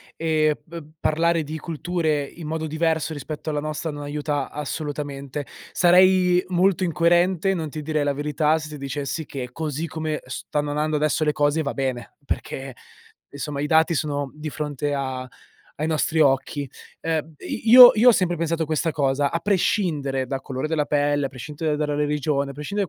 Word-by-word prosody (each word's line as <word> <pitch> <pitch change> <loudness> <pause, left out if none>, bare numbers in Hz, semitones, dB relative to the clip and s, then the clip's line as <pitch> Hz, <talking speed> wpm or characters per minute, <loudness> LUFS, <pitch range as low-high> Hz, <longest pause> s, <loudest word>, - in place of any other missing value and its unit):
e 155 -2 +1
b 170 0 -8 0.2
parlare 165 +1 +1
di 155 +2 -5
culture 160 -1 -1
in 160 +3 -10
modo 160 0 -3
diverso 160 0 0
rispetto 150 +2 -6
alla 150 -1 -1
nostra 155 +2 -3
non 145 0 -7
aiuta 145 -1 -2
assolutamente. 145 -1 -5 0.3
Sarei 180 0 +5
molto 185 +1 +2
incoerente, 175 +2 +2
non 160 -4 -3
ti 155 +1 -6
direi 150 -1 -1
la 145 - +1
verità 150 +2 +1
se 155 -1 -7
ti 150 - -7
dicessi 140 +2 -4
che 130 -3 -6
così 155 +2 -3
come 155 -1 -3
stanno 145 +3 -3
andando 150 +1 0
adesso 155 +1 +1
le 150 - +2
cose 145 +2 +1
va 145 - -2
bene, 130 -3 -3
perché 135 -2 -4 0.5
insomma 145 0 -5
i 145 - -1
dati 160 +2 +4
sono 145 -3 -2
di 155 +1 -6
fronte 145 -1 -3
a 130 -2 -3 0.5
ai 155 - 0
nostri 160 0 0
occhi. 140 -1 +2 0.3
Ehm 160 -1 -2
i 225 - -5
io 250 0 +12
io 230 +3 +5
ho - - +9
sempre 180 -4 +1
pensato 165 0 -1
questa 160 +1 0
cosa: 140 -1 +1
a 165 - -1
prescindere 165 -8 0
dal 135 +1 -3
colore 130 +2 -3
della 155 -2 0
pelle, 145 -1 +1
a - - -5
prescindere 150 +4 -3
dalla 150 -1 -1
religione, 145 -1 0
a - - -6
prescindere 185 +8 -3
150 Hz, 175 wpm, -23 LUFS, 145-165 Hz, 0.5 s, io